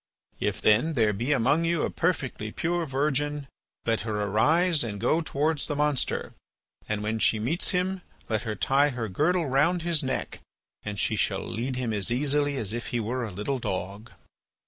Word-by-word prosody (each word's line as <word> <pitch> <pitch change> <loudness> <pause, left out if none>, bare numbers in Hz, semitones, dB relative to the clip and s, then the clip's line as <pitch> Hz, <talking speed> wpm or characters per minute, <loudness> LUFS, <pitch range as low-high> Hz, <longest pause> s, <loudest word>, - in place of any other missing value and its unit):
If, - - -1
then, 120 +10 +4
there 110 -6 +3
be 120 +8 -1
among 145 +4 +3
you 170 -1 +1
a - - -1
perfectly 135 -11 -1
pure 170 +3 -1
virgin, 145 +1 0 0.4
let 115 -1 +1
her 105 -2 -2
arise 150 - +3
and 105 -3 -4
go 160 +10 +2
towards 155 -1 0
the 145 - -2
monster; 150 -2 0 0.6
and 105 -1 -1
when 110 +1 -1
she 110 - +4
meets 125 +11 0
him 185 +1 0 0.3
let 110 -1 0
her 110 -3 -3
tie 140 +5 +3
her 120 -4 -3
girdle 160 - +1
round 155 +6 +2
his 170 -4 +1
neck 130 0 -3 0.4
and 105 -1 -5
she 110 - +1
shall 100 - 0
lead 125 +3 -3
him 125 -3 -2
as 100 0 -1
easily 145 +2 +1
as 110 -4 -3
if 120 0 -4
he 120 - -1
were 120 +3 -2
a 115 - -3
little 105 +8 -3
dog." 100 +2 -4
130 Hz, 185 wpm, -27 LUFS, 110-150 Hz, 0.6 s, then